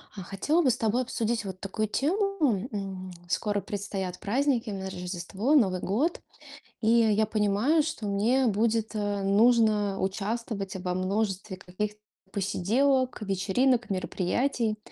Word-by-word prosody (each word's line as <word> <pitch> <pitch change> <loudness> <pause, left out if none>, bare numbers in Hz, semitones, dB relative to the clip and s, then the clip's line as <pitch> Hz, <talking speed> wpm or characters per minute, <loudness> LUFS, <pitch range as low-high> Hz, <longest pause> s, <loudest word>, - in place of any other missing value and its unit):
А, 195 - -6
хотела 245 - +1
бы 280 - +3
с 240 - +1
тобой 230 +2 +1
обсудить 230 -2 -2
вот 185 -1 -6
такую 215 +3 -2
тему. 300 - +1
М, 190 -3 -5 0.2
скоро 205 +2 0
предстоят 195 -3 -4
праздники, 245 +2 0
именно 195 -2 -4
Рождество, 185 - -2
Новый 190 -10 +3
год. 270 - 0 0.6
И 220 - +2
я 220 -2 +4
понимаю, 215 +9 +2
что 290 -9 -4
мне 230 +6 +2
будет, 220 +1 +1
э, 205 -1 -1
нужно 210 -1 +3
участвовать 200 +1 -3
во 180 -1 -2
множестве 195 +1 -1
каких 195 +3 -4 0.4
посиделок, 245 +8 +1
вечеринок, 215 +6 +1
мероприятий. 215 +5 -1
210 Hz, 130 wpm, -28 LUFS, 195-240 Hz, 0.6 s, я